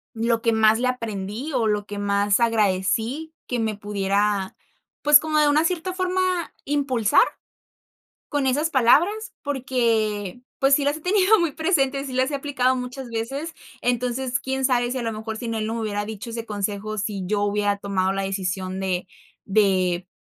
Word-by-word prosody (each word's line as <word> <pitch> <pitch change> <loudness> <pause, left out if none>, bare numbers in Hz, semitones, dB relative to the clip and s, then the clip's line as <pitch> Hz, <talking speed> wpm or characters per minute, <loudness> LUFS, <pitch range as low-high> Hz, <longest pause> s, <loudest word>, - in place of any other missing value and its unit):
Lo 230 0 +1
que 230 - +2
más 220 0 +4
le 250 +1 +1
aprendí 230 +2 -4
o 245 -4 +1
lo 210 -1 0
que 205 0 -6
más 200 +1 +1
agradecí 225 +7 0
que 245 - -2
me 220 -2 -1
pudiera, 200 -1 -1 0.5
pues, 295 0 +8
como 310 -1 0
de 300 -1 +5
una 300 +2 +3
cierta 360 +1 -1
forma, 370 0 -1 0.4
impulsar 265 -7 +2 1.1
con 285 -3 0
esas 295 +5 +1
palabras, 335 - +3
porque, 235 -6 -1 0.2
pues, 270 +1 +4
sí 285 - 0
las 285 +2 +1
he - - -13
tenido 390 +4 +4
muy 340 -3 +1
presente, 275 -4 +1
sí 265 - -6
las 260 +2 +1
he 285 - -1
aplicado 270 -2 +1
muchas 250 0 -6
veces. 270 +8 -4 0.3
Entonces, 250 +2 0
quién 265 0 -2
sabe 245 -2 +1
si, 260 - -2
a 245 - -3
lo 225 - -1
mejor, 220 0 -5
sin 230 -1 -4
él 215 -1 -2
no 225 - -3
me 230 - -3
hubiera 205 -1 -2
dicho 220 +2 -7
ese 230 0 -5
consejo, 210 0 -3
si 205 -1 -3
yo 205 +2 0
hubiera 205 0 +1
tomado 195 -1 0
la 195 0 -2
decisión 190 -1 -3
de 185 -1 -2 0.4
de 185 -3 +2
230 Hz, 180 wpm, -23 LUFS, 205-275 Hz, 1.1 s, pues